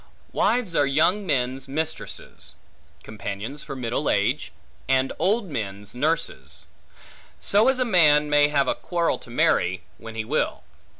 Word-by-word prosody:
Wives 230 -9 +1
are 145 - +3
young 170 +8 +2
men's 130 -1 0
mistresses; 155 +3 -4 0.5
companions 110 +6 -6
for 140 -2 -7
middle 125 +3 -1
age; 100 0 +1 0.4
and 130 0 +2
old 210 +4 +2
men's 100 -5 -5
nurses. 155 +7 -2 0.7
So 210 +4 +3
as 265 -1 +3
a 255 - +2
man 150 -8 +5
may 145 0 +5
have 145 -2 +1
a - - +2
quarrel 170 -2 -1
to - - -15
marry, 95 -5 +1 0.2
when 115 0 -9
he 110 -1 -3
will. - - -1
145 Hz, 140 wpm, -24 LUFS, 120-165 Hz, 0.7 s, man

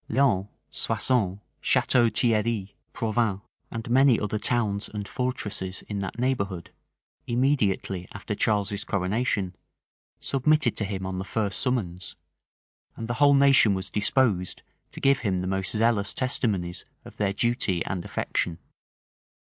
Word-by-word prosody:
Laon, 105 -8 +2 0.2
Soissons, 105 -8 0 0.2
Chateau 120 -2 +3
Thierri, 110 -4 0 0.2
Provins, 110 -3 -1 0.3
and 115 0 -6
many 130 0 +4
other 105 0 -2
towns 105 -3 0
and 105 -1 -6
fortresses 105 -7 -3
in 105 -1 -5
that 95 +2 -5
neighborhood, 100 -9 -2 0.6
immediately 110 -8 0
after 100 +1 -5
Charles's 100 -1 0
coronation, 100 -1 -1 0.6
submitted 140 -2 +2
to 105 - +1
him 95 -1 -4
on 95 0 -4
the - - -3
first 100 -1 -1
summons; 95 -9 -1 0.8
and 115 - -6
the 120 - -1
whole 145 -1 +7
nation 135 -7 +6
was 95 0 -3
disposed 105 -4 +1 0.3
to - - -10
give 135 0 +3
him 95 -5 -1
the - - -3
most 95 +1 -1
zealous 110 -2 +1
testimonies 95 -9 -1 0.2
of - - -13
their 100 -2 +1
duty 100 -5 +1
and 90 -2 -3
affection. 85 0 -2
105 Hz, 130 wpm, -26 LUFS, 95-120 Hz, 0.8 s, whole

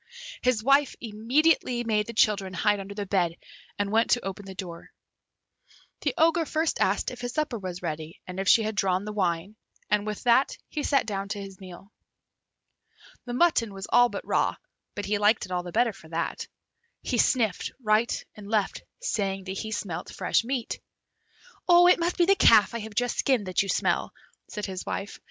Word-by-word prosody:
His 250 -4 +1
wife 275 +2 +3
immediately 240 +3 +1
made 215 -2 0
the 230 - -6
children 200 -4 +2
hide 205 0 +2
under 195 +1 -8
the 205 -1 -3
bed, 175 -4 0 0.4
and 205 0 -1
went 225 +1 +3
to 245 - +2
open 195 +1 -5
the 190 - -8
door. 175 -3 -8 1.1
The - - -1
Ogre 330 +1 +3
first 315 +1 -1
asked - - +1
if 245 -1 -9
his 245 0 -4
supper 300 -7 -1
was 185 -2 -6
ready 160 -1 -5
and 185 +1 -7
if 195 - 0
she 225 - +6
had 215 +1 -2
drawn 190 -1 0
the 210 - -5
wine, 185 +1 -1 0.3
and 210 0 +2
with 210 -1 -4
that 250 +2 +3
he 300 - -3
sat 280 -1 +2
down 200 -1 -4
to 205 0 -3
his 195 -1 -9
meal. 190 +2 -12 1.3
The 240 -1 -4
mutton 245 - +2
was 195 0 -6
all 245 +1 +6
but - - -6
raw, - - +1 0.4
but 205 - -4
he 205 +1 0
liked 210 +2 +3
it 185 - -13
all 180 -1 0
the 175 0 -8
better 230 +1 +2
for 160 - -15
that. 170 +1 -3 0.6
He 245 - -1
sniffed 225 -6 +1
right 215 -1 +1
and 205 -1 -11
left, 210 -3 0 0.2
saying 195 - -2
that 190 0 -5
he 220 - -5
smelt 200 -6 -4
fresh - - +1
meat. 245 0 -3 0.9
"It 355 +1 +7
must 345 +1 -1
be 345 - +4
the 395 - +5
calf 220 - +6
I 235 - -3
have 220 -1 -8
just 245 +2 0
skinned 255 -7 +2
that 185 -1 +1
you 200 - -3
smell," - - 0 0.3
said 210 -1 -4
his 190 -2 -5
wife. 200 - -5
210 Hz, 195 wpm, -27 LUFS, 195-245 Hz, 1.3 s, It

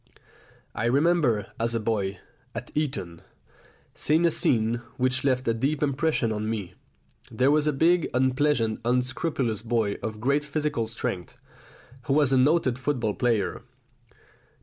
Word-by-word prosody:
I - - -2
remember, 140 -4 +2
as 115 0 0
a - - +1
boy 105 -3 -1 0.4
at - - -6
Eton, 100 - -3 0.7
seeing 160 +3 +2
a 170 - +4
scene 115 -4 +1 0.2
which 130 0 +1
left 130 -2 +1
a 115 - +3
deep 140 +6 -1
impression 145 -4 +1
on 110 0 -2
me. 105 -6 -4 0.6
There 130 +4 +2
was 150 0 +2
a - - +4
big 165 +4 +2
unpleasant 130 -3 +1
unscrupulous 125 -1 -1
boy 115 -3 0
of 110 -1 -5
great 140 +6 +1
physical 150 -5 -2
strength, 95 -6 -5 0.7
who 135 - +1
was 145 -2 +3
a - - +4
noted 130 -3 +2
football 125 -6 -1
player. 115 -5 0
125 Hz, 140 wpm, -26 LUFS, 110-145 Hz, 0.7 s, a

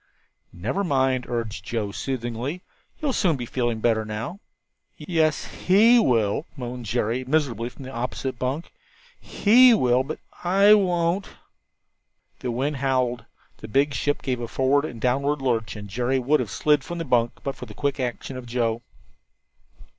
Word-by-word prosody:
"Never 120 - -2
mind," 130 -6 +1
urged 115 -6 -3
Joe, 105 -1 -3
soothingly, 130 - -4 0.3
"you'll 295 -5 -1
soon 180 -9 +2
be 120 - -5
feeling 120 -2 -2
better 110 -1 +2
now." 110 - -5 0.6
"Yes, 160 -4 0
he 225 +6 +4
will," 115 - +1
moaned 125 -2 -6
Jerry, 120 +3 -1
miserably, 130 -4 0
from 130 +3 -13
the 130 - -7
opposite 125 +1 -4
bunk; 135 +6 -3 0.5
"he 245 +3 +5
will, 125 - +3
but 155 +4 -5 0.3
I 195 +4 +6
won't." 180 -2 +2 1.1
The 125 - -4
wind 135 +5 -1
howled, 130 -3 0 0.3
the 110 - -9
big 140 +6 +2
ship 145 +3 -1
gave 125 -2 -1
a 120 - -4
forward 135 +4 +2
and 120 -7 -7
downward 140 +5 +1
lurch, 115 -5 -1
and 105 -1 -8
Jerry 125 +6 0
would 135 +4 +2
have - - -2
slid 150 -2 +2
from 175 - -6
his 165 -2 -4
bunk 120 -2 +2
but 140 - -2
for 125 - -9
the 105 - -11
quick 140 +4 -1
action 125 +1 -4
of 125 -1 -8
Joe. 115 -1 -1
130 Hz, 160 wpm, -24 LUFS, 120-150 Hz, 1.1 s, I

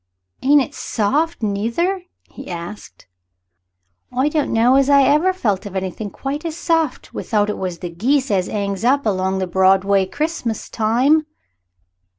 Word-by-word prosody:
"Ain't 285 +1 +5
it - - -9
soft, 290 +8 -1
neither," 230 - -1 0.3
he - - -11
answered. 175 +3 -8 1.1
"I 260 +4 +1
don't 300 -2 -1
know 230 +3 +4
as 275 0 +3
ever 285 +5 +4
I - - +4
felt 210 - -1
of 195 - -10
anythink 190 +2 -4
quite 280 +2 -4
as 330 -1 -4
soft 325 -5 -1
without 210 -1 0
it - - -6
was 185 -2 -3
the 175 0 -6
geese 255 +9 0
as 185 -2 +1
'angs 200 -1 -3
up 275 +3 +2
along 190 -2 0
the 190 - -1
Broadway 190 +1 +3
Christmas 295 - -3
time." 260 +8 +2
230 Hz, 155 wpm, -19 LUFS, 195-290 Hz, 1.1 s, Ain't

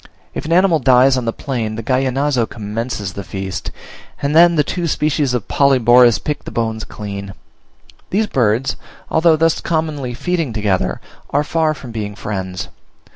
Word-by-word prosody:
If - - -5
an 160 - -4
animal 175 -2 +4
dies 130 0 +5
on 125 -2 -2
the 115 - 0
plain 115 -5 -3
the 115 - -5
Gallinazo 130 0 +1
commences 110 -2 -4
the 100 - -6
feast, 95 +1 -5 0.5
and 145 +2 -1
then 170 +1 +7
the 150 - +3
two 175 +3 -3
species 150 -4 0
of 120 - -3
Polyborus 125 -4 +5
pick 150 - -4
the - - -7
bones 110 -1 -2
clean. 100 -2 -7 0.7
These 215 +3 +1
birds, 125 - 0 0.3
although 160 0 +4
thus 165 0 +1
commonly 155 -6 -2
feeding 165 -3 -2
together, 105 -4 0 0.3
are 145 +1 +1
far 155 0 0
from 130 -4 -10
being 105 -2 -5
friends. 95 -3 -5
125 Hz, 160 wpm, -18 LUFS, 110-150 Hz, 0.7 s, then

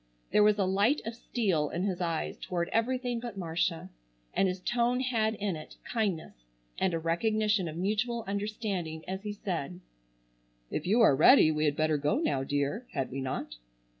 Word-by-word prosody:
There - - +5
was 210 0 +5
a 195 - +2
light 200 +10 +2
of 225 - -3
steel 195 - 0
in 175 - -2
his 185 -3 -1
eyes 165 -2 -1
toward 170 -1 -3
everything 245 +1 0
but 235 -4 -7
Marcia, 165 - -2 0.4
and 195 - +3
his 185 0 -2
tone 240 +5 +1
had 225 -4 +1
in 205 -3 -2
it 155 - -10
kindness 205 -9 -2 0.5
and 185 -3 +1
a - - +1
recognition 210 +4 +1
of 160 0 -6
mutual 215 +5 -1
understanding 200 -5 -3
as 190 +1 -4
he 210 0 -4
said: 180 -4 -4 0.9
"If 155 - -3
you 220 +5 +4
are 180 -11 +6
ready 155 - +7
we 155 0 0
had 145 -1 +2
better 155 0 +2
go 145 +1 +1
now, 135 -2 0
dear, 145 - -1
had 135 -4 -2
we 135 +1 -3
not?" 130 - -4
190 Hz, 180 wpm, -30 LUFS, 160-220 Hz, 0.9 s, ready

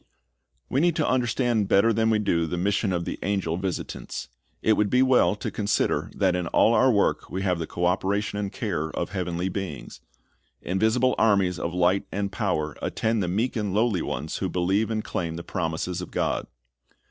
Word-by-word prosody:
We 135 - 0
need 170 -1 +3
to 155 -4 +1
understand 120 -3 +1
better 115 +5 +4
than 110 +1 +2
we 110 - +3
do 85 -6 +1
the 90 - -3
mission 100 +2 +1
of 85 -1 -1
the - - -4
angel 95 -4 -1
visitants. 95 0 -4 0.3
It 110 - +4
would 105 -1 +1
be 125 +3 +4
well 130 -5 +4
to 105 - -5
consider 105 -1 0
that 95 -2 +2
in 90 -1 -2
all 115 - +4
our 130 +4 +5
work 100 -3 +1
we 95 +1 -3
have 90 -3 +1
the 80 - -3
co 90 - -2
operation 100 +3 0
and 100 -1 -3
care 90 -7 -2
of - - -4
heavenly 90 -2 -2
beings. 95 -7 -6 0.6
Invisible 110 +7 +1
armies 100 -5 +3
of 85 +1 -3
light 90 +2 +2
and 100 0 -2
power 80 -9 -1
attend 110 -1 0
the 90 - -1
meek 110 +8 0
and 105 -4 -2
lowly 110 -5 +2
ones 75 +5 -3
who 95 - -2
believe 95 +5 +1
and 110 -1 -1
claim 85 -2 -3
the 85 - -6
promises 85 +1 -3
of 90 - -7
God. - - -1
100 Hz, 195 wpm, -25 LUFS, 90-110 Hz, 0.6 s, our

